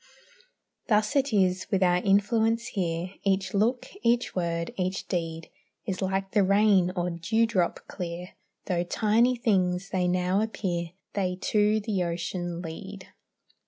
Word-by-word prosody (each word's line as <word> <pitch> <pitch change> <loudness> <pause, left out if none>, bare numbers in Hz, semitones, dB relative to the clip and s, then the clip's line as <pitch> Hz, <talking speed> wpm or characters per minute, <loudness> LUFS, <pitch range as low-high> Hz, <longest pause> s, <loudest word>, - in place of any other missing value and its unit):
Thus 215 +3 +2
is 275 -1 +2 0.3
it - - -33
with 195 -1 +3
our 180 -1 +4
influence 220 +4 +2
here; 175 -2 -2
Each 190 -1 0
look, 230 +5 +1 0.2
each 240 +1 +1
word, 170 -2 -1
each 185 0 -2
deed, 165 -2 -3 0.3
Is 190 -4 -3
like 190 0 -1
the 210 - +3
rain, 200 -2 +4
or 175 -1 -1
dewdrop 190 +2 0
clear 175 0 -6 0.4
Though 175 -1 0
tiny 225 +7 +2
things 190 -5 0
they 180 -2 +1
now 180 +2 +1
appear, 175 -6 -2 0.2
They 185 -3 -1
to 210 0 +3
the 205 -4 -1
ocean 175 0 -3
lead. 190 +4 -8
190 Hz, 135 wpm, -27 LUFS, 175-210 Hz, 0.4 s, our